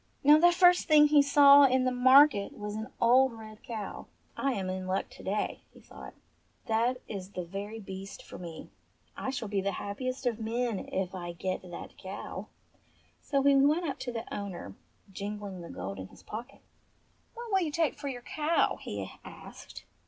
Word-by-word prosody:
Now 295 +2 +7
the 350 +2 +6
first 355 0 +5
thing 305 -2 +7
he 295 -1 +6
saw 280 0 +7
in 260 -1 +3
the 255 - +1
market 255 -3 +5
was 210 0 -5
an 220 +1 -5
old 255 +2 +4
red 215 -1 -11
cow. 220 -4 -7 0.3
"I 275 -1 0
am 195 -5 -3
in 185 0 -4
luck 190 +1 -2
to - - -13
day," 205 +2 -2
he - - -14
thought, - - -12 0.5
"that 235 +3 +1
is 195 -3 -6
the 180 - -4
very 200 +5 -6
beast 195 -1 -8
for - - -11
me. 170 -3 -9 0.4
I - - -4
shall 245 -4 -4
be 200 -1 -1
the 200 0 -1
happiest 255 +8 -4
of 235 -2 0
men 230 -1 -1
if 185 -1 -2
I 175 -2 -6
get 185 +2 -3
that 175 -2 -10
cow." 190 +1 -7 0.7
So 275 -2 0
he 280 0 +5
went 295 +6 +3
up 280 - -4
to 245 - -4
the 230 -1 -5
owner, 195 - -6 0.4
jingling 200 -1 -6
the 170 - -9
gold 95 +2 -6
in 95 - -7
his - - -18
pocket. 235 +5 -8 0.7
"What 470 -1 -8
will 385 -1 +3
you 320 -4 -1
take 325 0 +1
for 285 - -7
your 245 -3 -5
cow 310 +5 0
.?" - - -19
he - - -5
asked. - - -11
225 Hz, 190 wpm, -29 LUFS, 195-275 Hz, 0.7 s, Now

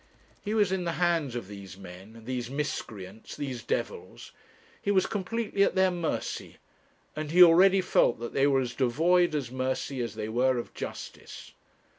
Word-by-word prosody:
He 210 +1 -2
was 205 -4 +3
in 190 -1 -1
the 170 -1 -2
hands 165 -8 0
of 120 -6 -5
these 100 -2 -10
men, 95 +4 -12
these 125 -1 -3
miscreants, 110 -8 -5
these 130 -5 -5
devils; 450 - -4 0.5
he - - -3
was 190 -2 +3
completely 205 +1 -2
at 200 - +3
their 190 0 +4
mercy, 175 -3 -3 0.6
and 155 -1 -4
he 180 +3 +8
already 185 +3 +6
felt 120 - +2
that 120 0 -6
they 135 +1 +3
were 135 -2 +3
as 125 -1 -4
devoid 165 +6 +2
of 135 -5 -3
mercy 130 0 -2
as 120 - -4
they 105 - -4
were 125 +3 +2
of 120 - -5
justice. - - -8
140 Hz, 170 wpm, -28 LUFS, 120-180 Hz, 0.6 s, he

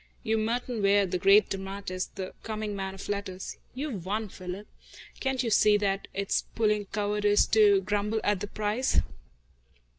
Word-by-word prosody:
You're 220 0 +1
Merton 235 +1 -1
Ware, 200 0 +4
the 180 -1 -2
great 195 +2 +5
dramatist, 195 -1 -4
the 190 -2 -5
coming 215 -2 -4
man 190 -1 -4
of 195 - -8
letters. 200 -2 -4 0.2
You've 260 - -4
won, 210 +3 -2
Philip. 185 +3 -7 0.5
Can't 265 -2 0
you 230 - -1
see 210 0 +5
that 200 -1 -1
it's 200 0 -1
puling 210 -2 +1
cowardice 205 0 +2
to 205 -3 +6
grumble 205 +3 0
at 205 -2 +1
the 205 - -4
price?" 215 +5 +1
205 Hz, 155 wpm, -28 LUFS, 195-215 Hz, 0.5 s, to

